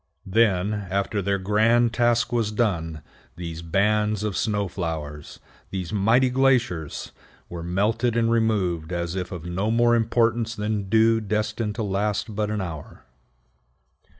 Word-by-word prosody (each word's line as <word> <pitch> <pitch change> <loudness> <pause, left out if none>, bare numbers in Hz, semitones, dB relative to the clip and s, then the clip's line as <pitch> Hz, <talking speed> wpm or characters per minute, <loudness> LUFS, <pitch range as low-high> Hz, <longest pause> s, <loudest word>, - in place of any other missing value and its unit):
Then, 100 -1 +2
after 100 0 -2
their 100 +1 0
grand 110 +4 +2
task 120 0 +2
was 115 -3 +1
done, 80 -9 -1 0.3
these 85 -1 -6
bands 105 +4 +1
of 105 -3 -2
snow 105 +1 0
flowers, 80 -5 -5 0.3
these 95 -1 -5
mighty 115 +6 +3
glaciers, 125 - +1 0.4
were 85 -1 -6
melted 105 +7 0
and 115 0 +2
removed 95 -8 0
as 85 -1 -2
if 90 0 -4
of 85 -3 -7
no 95 +5 -1
more 120 +1 +4
importance 115 0 +1
than 105 -2 -2
dew 115 +1 +4
destined 105 0 -2
to 115 - -2
last 105 +2 -1
but 105 0 -1
an 105 -1 -2
hour. 80 -7 -7
105 Hz, 140 wpm, -24 LUFS, 90-115 Hz, 0.4 s, more